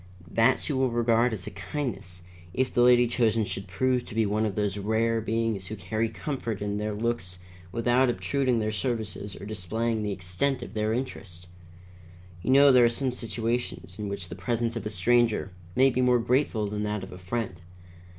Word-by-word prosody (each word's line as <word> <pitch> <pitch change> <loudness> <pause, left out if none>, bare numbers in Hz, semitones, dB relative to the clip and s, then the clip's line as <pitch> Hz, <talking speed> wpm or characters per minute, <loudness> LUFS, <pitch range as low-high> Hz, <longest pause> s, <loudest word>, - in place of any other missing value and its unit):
That 115 0 +4
she 150 - -2
will 130 -1 +2
regard 120 0 +2
as 100 -5 -4
a 105 - -6
kindness, 95 -3 -5 0.3
if 130 -1 0
the 120 - +3
lady 120 0 +6
chosen 115 -2 +1
should 100 0 -5
prove 125 +6 +1
to - - -10
be 110 -1 +3
one 105 +2 +1
of 100 - -4
those 105 -2 0
rare 110 +3 +1
beings 110 -4 -1
who 110 - -5
carry 110 +4 -2
comfort 120 -8 -4
in 105 0 -2
their 105 0 -2
looks 105 -5 -2 0.3
without 120 +4 +3
obtruding 130 0 0
their 110 -1 0
services 105 -4 -3
or - - -9
displaying 110 +3 -2
the 105 -1 -2
extent 95 +9 -1
of - - -9
their 110 0 0
interest. 95 -8 -5 1.0
You - - -4
know 140 +1 +7
there 125 -2 +7
are - - +5
some 130 +2 -1
situations 115 -4 -3
in 105 -1 -3
which 100 -3 -5
the - - -6
presence 115 -1 -1
of 115 -2 -3
a - - -2
stranger 115 -3 +2 0.2
may 135 +1 +5
be 130 - 0
more 125 -1 +4
grateful 120 -2 +1
than 105 +1 -3
that 105 -2 -2
of 95 - -8
a 90 - -9
friend. 95 -2 -4
115 Hz, 195 wpm, -27 LUFS, 105-120 Hz, 1.0 s, know